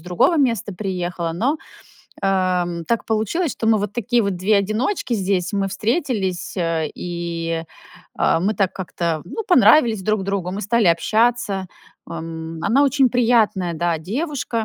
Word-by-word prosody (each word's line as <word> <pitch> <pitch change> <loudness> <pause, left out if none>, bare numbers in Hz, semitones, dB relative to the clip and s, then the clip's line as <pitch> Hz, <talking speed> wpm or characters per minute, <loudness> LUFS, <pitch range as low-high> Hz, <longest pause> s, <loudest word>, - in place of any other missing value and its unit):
другого 180 - +2
места 230 - +1
приехала, 180 -3 -3
но, 255 - 0 0.7
э, 180 -3 0
так 230 -1 -1
получилось, 225 - 0
что 225 - -4
мы 220 -1 +4
вот 205 0 -3
такие 240 +1 +1
вот 200 -3 -1
2 200 +4 +2
одиночки. 225 - 0
Здесь 190 -1 -1
мы 195 -1 0
встретились, 210 - -1
э, 165 -3 -1
и, 170 -1 -4 0.5
а, - - +2
мы 200 +4 +1
так 195 -3 0
как-то, 170 -4 -3
ну, 435 - -5
понравились 230 - +5
друг 215 -1 0
другу, 195 -2 -2
мы 195 +3 -4
стали 215 +1 +1
общаться. 205 +1 +1 0.4
М, 165 0 -6
она 270 +5 +3
очень 275 -1 +3
приятная, 225 -7 +2
да, 170 0 0
девушка 235 - -3
200 Hz, 150 wpm, -21 LUFS, 175-235 Hz, 0.7 s, понравились